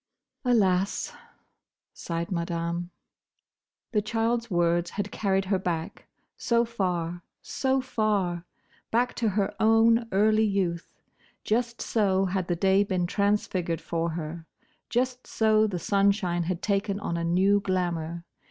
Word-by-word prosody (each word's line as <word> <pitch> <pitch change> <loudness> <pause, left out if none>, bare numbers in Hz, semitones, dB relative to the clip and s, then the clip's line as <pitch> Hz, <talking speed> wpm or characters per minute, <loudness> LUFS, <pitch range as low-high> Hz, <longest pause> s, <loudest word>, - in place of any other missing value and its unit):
"Alas!" 200 -6 +1 0.8
sighed 170 +2 -4
Madame. 170 0 -2 1.0
The 210 -3 +2
child's 230 +2 -1
words 175 -1 +1
had 205 0 -4
carried 195 -2 0
her 190 0 +1
back, 175 +1 -4 0.3
so 235 0 +1
far, 175 -6 -2 0.2
so 265 0 0
far! 205 -8 0 0.5
Back 245 +2 +1
to 230 -3 +1
her 200 0 0
own 225 +1 +4
early 215 +2 +3
youth. 190 -5 -1 0.5
Just 235 +2 -1
so 195 -3 +2
had 185 -1 -1
the 175 - 0
day 195 +3 +3
been 185 -3 -1
transfigured 185 -3 0
for 165 0 -2
her. 165 +1 -6 0.4
Just 250 +1 -1
so 215 -1 +3
the 190 -4 -3
sunshine 195 -2 +1
had 175 0 -3
taken 200 -1 0
on 170 -4 -3
a 170 - -2
new 190 +4 +3
glamour. 170 -3 -2
195 Hz, 125 wpm, -27 LUFS, 175-215 Hz, 1.0 s, own